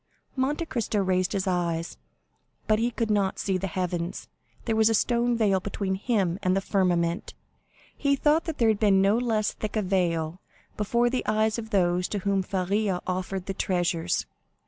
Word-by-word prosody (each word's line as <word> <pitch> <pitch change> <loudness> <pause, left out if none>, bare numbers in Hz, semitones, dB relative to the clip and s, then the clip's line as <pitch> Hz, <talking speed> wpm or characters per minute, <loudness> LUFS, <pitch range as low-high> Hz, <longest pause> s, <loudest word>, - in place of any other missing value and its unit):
Monte 285 +5 0
Cristo 230 -7 -2
raised 185 0 +1
his 195 -1 -1
eyes, 170 -3 -1 0.7
but 215 0 +2
he 235 +2 +1
could 230 -2 -2
not 200 -2 +1
see 195 - -1
the 195 - -2
heavens; 175 -1 -3 0.4
there 225 - 0
was 220 0 +4
a 225 - +2
stone 240 +2 +1
veil 200 -4 +3
between 195 0 -3
him 195 -3 0
and 185 0 +2
the - - +3
firmament. 180 -3 0 0.6
He 280 -1 +1
thought 300 +4 +2
that 325 -3 -4
there 230 -2 +3
had 215 -2 +1
been 200 -3 +4
no 195 +2 +4
less 220 -4 0
thick 215 0 -5
a 215 - +1
veil 175 -3 0 0.3
before 235 +3 +1
the 255 - -1
eyes 215 +1 +1
of 220 -1 -7
those 180 -3 +2
to 210 - -3
whom 200 -1 +2
Faria 190 +1 -1
offered 185 0 -3
the 195 - -3
treasures. 175 -2 0
195 Hz, 180 wpm, -26 LUFS, 185-220 Hz, 0.7 s, was